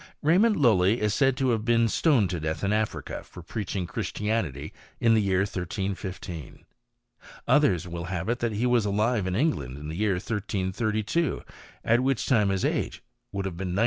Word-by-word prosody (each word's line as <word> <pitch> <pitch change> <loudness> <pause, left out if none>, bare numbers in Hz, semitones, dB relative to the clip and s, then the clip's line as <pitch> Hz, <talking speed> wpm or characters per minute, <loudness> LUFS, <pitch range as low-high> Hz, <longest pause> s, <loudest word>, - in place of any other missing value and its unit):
Raymond 195 +9 +4
Lujly 110 - +4
is 105 -1 +1
said 135 0 +2
to 130 0 +1
have 115 -3 +1
been 115 0 +3
stoned 115 - +2
to 90 - -2
death 80 +2 -3
in 100 +1 +1
Africa 110 0 -2
for 90 - -12
preaching 95 0 -3
Christianity 85 - -3 0.3
in 115 -1 +4
the 110 - +4
year 95 -2 +2
1315. 95 -3 -5 0.8
Others 95 - +3
will 85 -1 -5
have 90 0 -3
it 120 +1 0
that 120 -2 -1
he 110 +4 0
was 120 -2 +3
alive 105 0 +1
in 95 - -1
England 75 - 0
in 75 +1 -7
the 80 - -5
year 105 +1 +1
1332, 105 - -1 0.4
at 115 +1 +4
which 130 -1 0
time 105 -6 +3
his 95 -1 0
age - - -2 0.3
would 100 0 -3
have 90 -3 -4
been 90 -1 -3
97. - - 0
105 Hz, 180 wpm, -27 LUFS, 90-115 Hz, 0.8 s, Raymond